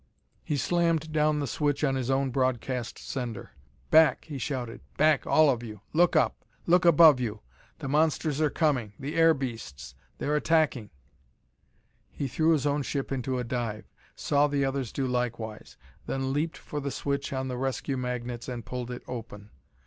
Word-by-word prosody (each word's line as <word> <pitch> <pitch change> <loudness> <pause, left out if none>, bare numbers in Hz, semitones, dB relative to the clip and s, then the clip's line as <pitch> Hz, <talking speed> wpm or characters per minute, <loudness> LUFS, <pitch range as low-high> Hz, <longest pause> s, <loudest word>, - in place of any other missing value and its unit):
He 150 - -1
slammed 165 +1 +1
down 150 -1 +2
the 145 - -1
switch 145 +3 -1
on 135 -2 +2
his 130 -1 -2
own 135 0 +1
broadcast 130 -1 -1
sender. 120 -5 -5 0.4
"Back!" 155 -4 +5
he 145 -4 -6
shouted; 125 -3 -4 0.2
"back, 155 -1 +3
all 155 0 +5
of 120 -3 -2
you! 105 -4 -9
Look 175 +2 +4
up! - - +2 0.2
Look 180 +1 +4
above 160 -4 +7
you! 110 -4 -3 0.4
The - - -6
monsters 155 +1 +1
are 155 - +3
coming! 135 -10 0
the 140 +2 -5
air 165 -1 +5
beasts! 115 - -6 0.2
they - - -5
are 150 - 0
attacking!" 150 -8 +1 1.2
He 140 - -4
threw 155 +5 +1
his 150 -3 0
own 145 0 +1
ship 140 0 -3
into 130 -1 -1
a 125 - -1
dive; 115 -3 -3 0.3
saw 145 0 +2
the 140 -1 0
others 135 -3 -2
do 135 - -2
likewise; 120 -4 -3 0.3
then 135 0 -1
leaped 155 +3 -1
for 150 - -6
the 140 0 -3
switch 140 +1 -3
on 130 -1 -2
the 125 - -3
rescue 135 +1 -2
magnets 125 -1 -4
and 120 -3 -5
pulled 125 -1 -5
it 125 - -6
open. 110 -4 -8
135 Hz, 175 wpm, -28 LUFS, 125-150 Hz, 1.2 s, above